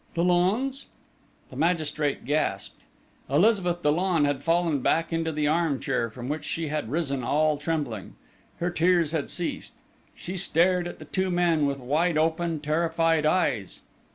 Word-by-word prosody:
"Dollon's?" 190 Hz, +11 st, +1 dB, 0.6 s
The -, -, -10 dB
magistrate 155 Hz, -3 st, 0 dB
gasped. 140 Hz, -9 st, -1 dB, 0.5 s
Elizabeth 175 Hz, +2 st, +2 dB
Dollon 165 Hz, +1 st, +2 dB
had 145 Hz, -1 st, -1 dB
fallen 165 Hz, -2 st, +1 dB
back 165 Hz, +6 st, +1 dB
into 165 Hz, 0 st, 0 dB
the 150 Hz, -1 st, -1 dB
arm 155 Hz, -3 st, +1 dB
chair, 125 Hz, -4 st, -1 dB
from 120 Hz, +3 st, -8 dB
which 150 Hz, +2 st, -3 dB
she 155 Hz, +1 st, -3 dB
had 150 Hz, -7 st, -3 dB
risen 140 Hz, -3 st, -2 dB
all 150 Hz, +3 st, +1 dB
trembling. 145 Hz, -, -3 dB, 0.4 s
Her 175 Hz, +1 st, -1 dB
tears 175 Hz, -2 st, +2 dB
had 160 Hz, -3 st, -2 dB
ceased. 175 Hz, -2 st, -4 dB, 0.4 s
She 185 Hz, +2 st, -6 dB
stared 175 Hz, 0 st, +2 dB
at -, -, -8 dB
the -, -, -11 dB
two 190 Hz, 0 st, -1 dB
men 170 Hz, -4 st, +2 dB
with 140 Hz, -1 st, -2 dB
wide 155 Hz, +6 st, 0 dB
open, 160 Hz, 0 st, 0 dB
terrified 165 Hz, 0 st, +1 dB
eyes. 155 Hz, -, 0 dB
160 Hz, 150 wpm, -26 LUFS, 145-175 Hz, 0.6 s, Elizabeth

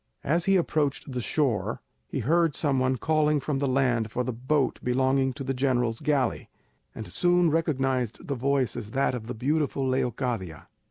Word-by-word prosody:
As 165 Hz, +4 st, +1 dB
he 195 Hz, -, +4 dB
approached 150 Hz, -6 st, 0 dB
the 125 Hz, -1 st, -3 dB
shore 115 Hz, -4 st, 0 dB, 0.3 s
he -, -, -3 dB
heard 165 Hz, +4 st, +2 dB
some 140 Hz, -4 st, +1 dB
one 130 Hz, 0 st, +1 dB
calling 150 Hz, +1 st, +2 dB
from 140 Hz, 0 st, -2 dB
the 140 Hz, -, 0 dB
land 125 Hz, -4 st, +1 dB
for 125 Hz, -, -1 dB
the 130 Hz, -, -3 dB
boat 130 Hz, +4 st, 0 dB
belonging 130 Hz, +1 st, +2 dB
to 140 Hz, -, -6 dB
the 135 Hz, 0 st, -2 dB
general's 125 Hz, -3 st, 0 dB
galley, 145 Hz, -4 st, 0 dB, 0.5 s
and 110 Hz, -, -6 dB
soon 175 Hz, -2 st, +2 dB
recognised 135 Hz, -, -1 dB
the 140 Hz, -, -1 dB
voice 135 Hz, -2 st, 0 dB
as 105 Hz, -, -6 dB
that 135 Hz, -, +2 dB
of 115 Hz, -3 st, -5 dB
the 125 Hz, -, -5 dB
beautiful 140 Hz, +2 st, 0 dB
Leocadia. 125 Hz, -, -2 dB
135 Hz, 175 wpm, -27 LUFS, 125-150 Hz, 0.5 s, he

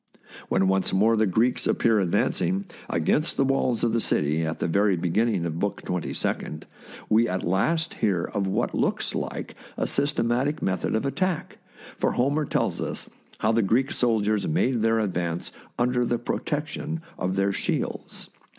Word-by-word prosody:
When 95 Hz, 0 st, +2 dB
once 95 Hz, 0 st, +2 dB
more 110 Hz, +4 st, +4 dB
the 110 Hz, -1 st, +3 dB
Greeks 115 Hz, +7 st, +2 dB
appear 115 Hz, -2 st, +3 dB
advancing 90 Hz, -1 st, +1 dB
THE 95 Hz, +2 st, +1 dB
BOOK 100 Hz, -, -4 dB
OF -, -, -20 dB
FAMOUS -, -, -16 dB
SIEGES -, -, -2 dB
against 155 Hz, -, +1 dB
the -, -, +4 dB
walls 130 Hz, -3 st, +1 dB
of 115 Hz, -2 st, +2 dB
the 115 Hz, -, +2 dB
city 75 Hz, -2 st, +1 dB
at 80 Hz, 0 st, -3 dB
the -, -, 0 dB
very 100 Hz, +2 st, +2 dB
beginning 95 Hz, +2 st, +1 dB
of 80 Hz, 0 st, -3 dB
Book 100 Hz, -1 st, -2 dB
Twenty 90 Hz, -2 st, -3 dB
second, -, -, -3 dB, 0.4 s
we 115 Hz, +2 st, +3 dB
at 90 Hz, 0 st, -2 dB
last 160 Hz, -, +1 dB
hear 95 Hz, -5 st, 0 dB
of 100 Hz, -2 st, -2 dB
what 105 Hz, +6 st, 0 dB
looks -, -, 0 dB
like -, -, -4 dB, 0.2 s
a -, -, 0 dB
systematic 140 Hz, +1 st, 0 dB
method 95 Hz, +2 st, -1 dB
of 110 Hz, -, 0 dB
attack, 185 Hz, +4 st, -2 dB, 0.4 s
for -, -, +1 dB
Homer 145 Hz, +5 st, +1 dB
tells -, -, -1 dB
us -, -, -5 dB, 0.3 s
how 110 Hz, -, +3 dB
the 115 Hz, +1 st, +3 dB
Greek 120 Hz, +7 st, +2 dB
soldiers 110 Hz, -4 st, +1 dB
made 120 Hz, +9 st, +1 dB
their 115 Hz, 0 st, +3 dB
ad 105 Hz, -4 st, -1 dB
vance 85 Hz, -1 st, -2 dB, 0.3 s
under 125 Hz, 0 st, +2 dB
the 120 Hz, 0 st, 0 dB
protection 150 Hz, +5 st, -3 dB, 0.2 s
of 95 Hz, +1 st, -1 dB
their 100 Hz, 0 st, +2 dB
shields. -, -, -3 dB
110 Hz, 185 wpm, -25 LUFS, 95-125 Hz, 0.4 s, more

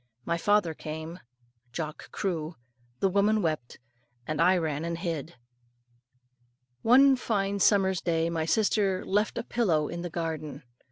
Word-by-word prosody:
My 170 Hz, -, 0 dB
father 205 Hz, -1 st, +2 dB
came. 160 Hz, +3 st, -7 dB, 0.5 s
Jock 155 Hz, +2 st, -6 dB
crew. 165 Hz, -4 st, -3 dB, 0.5 s
The -, -, +4 dB
woman 205 Hz, +2 st, +2 dB
wept, 155 Hz, -7 st, -2 dB, 0.5 s
and 155 Hz, -1 st, -2 dB
I 185 Hz, +1 st, +5 dB
ran 155 Hz, -3 st, -2 dB
and 170 Hz, 0 st, -3 dB
hid. 165 Hz, -2 st, -4 dB, 1.5 s
One 270 Hz, +3 st, +6 dB
fine 200 Hz, -5 st, -1 dB
summer's 190 Hz, -2 st, +3 dB
day 165 Hz, -1 st, 0 dB
my 165 Hz, -1 st, -1 dB
sister 200 Hz, 0 st, +1 dB
left 210 Hz, +3 st, 0 dB
a -, -, -2 dB
pillow 170 Hz, -12 st, 0 dB
in 170 Hz, +1 st, -5 dB
the 175 Hz, -, -4 dB
garden. 160 Hz, -3 st, -4 dB
170 Hz, 135 wpm, -28 LUFS, 160-200 Hz, 1.5 s, One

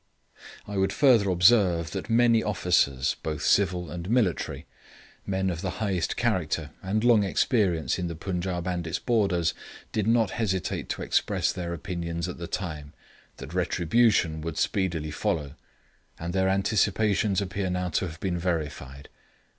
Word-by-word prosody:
I 100 Hz, -1 st, -4 dB
would 95 Hz, 0 st, +2 dB
further 120 Hz, -8 st, +4 dB
observe 90 Hz, -3 st, +4 dB
that 105 Hz, -, -5 dB
many 115 Hz, 0 st, +4 dB
officers, 85 Hz, -10 st, +1 dB
both 75 Hz, -2 st, -4 dB
civil 90 Hz, -5 st, +2 dB
and 85 Hz, +1 st, -6 dB
military, 115 Hz, -8 st, 0 dB, 0.6 s
men 95 Hz, -1 st, 0 dB
of 85 Hz, -1 st, -5 dB
the 95 Hz, -, -2 dB
highest 95 Hz, -6 st, -1 dB
character -, -, -1 dB
and 105 Hz, +4 st, -1 dB
long 120 Hz, -4 st, +5 dB
experience 95 Hz, -, +1 dB
in 90 Hz, -, -2 dB
the 85 Hz, -, -5 dB
Punjaub 90 Hz, 0 st, -3 dB
and 90 Hz, -2 st, -2 dB
its 80 Hz, -, -1 dB
borders, 100 Hz, -9 st, +1 dB, 0.4 s
did 105 Hz, -1 st, -1 dB
not 115 Hz, -3 st, +3 dB
hesitate 95 Hz, -7 st, -2 dB
to -, -, -3 dB
express -, -, +1 dB
their 85 Hz, -2 st, -4 dB
opinions 85 Hz, 0 st, -4 dB
at 90 Hz, -, -7 dB
the 85 Hz, -, -5 dB
time, 75 Hz, -7 st, -5 dB, 0.4 s
that 65 Hz, +5 st, -9 dB
retribution 90 Hz, -2 st, +2 dB
would 80 Hz, -1 st, -5 dB
speedily 85 Hz, -6 st, -1 dB
follow; 75 Hz, -2 st, -2 dB, 0.7 s
and 85 Hz, +1 st, -4 dB
their 95 Hz, 0 st, +2 dB
anticipations 100 Hz, 0 st, +1 dB
appear 95 Hz, -1 st, -2 dB
now 90 Hz, 0 st, -1 dB
to 90 Hz, +3 st, -1 dB
have 80 Hz, -1 st, -9 dB
been 90 Hz, -2 st, -2 dB
verified. 75 Hz, -6 st, -4 dB
90 Hz, 150 wpm, -26 LUFS, 85-100 Hz, 0.7 s, long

